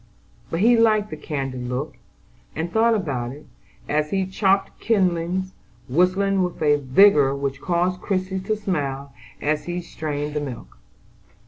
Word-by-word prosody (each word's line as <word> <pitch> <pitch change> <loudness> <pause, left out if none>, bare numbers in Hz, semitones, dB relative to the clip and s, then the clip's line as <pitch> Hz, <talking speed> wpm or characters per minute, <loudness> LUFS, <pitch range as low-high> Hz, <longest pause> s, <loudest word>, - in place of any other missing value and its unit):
But 165 - -2
he 240 +3 +6
liked 215 -2 +3
the - - -4
candid 135 -5 -4
look, 130 +5 -3 0.6
and 165 +3 -3
thought 225 +2 +3
about 130 - -2
it, 145 - -13 0.4
as 150 0 0
he 190 +1 0
chopped 195 +1 +1
kindlings, 185 -3 +1 0.4
whistling 185 +6 +2
with 180 -1 -2
a 145 -1 +4
vigor 140 0 +5
which 140 -1 -3
caused 180 +1 0
Christie 190 -1 -1
to 195 +3 -1
smile 140 -9 -3 0.3
as 150 +1 0
she 175 0 -3
strained 150 -3 -4
the 150 - -1
milk. 135 -5 -8
170 Hz, 145 wpm, -23 LUFS, 145-190 Hz, 0.6 s, he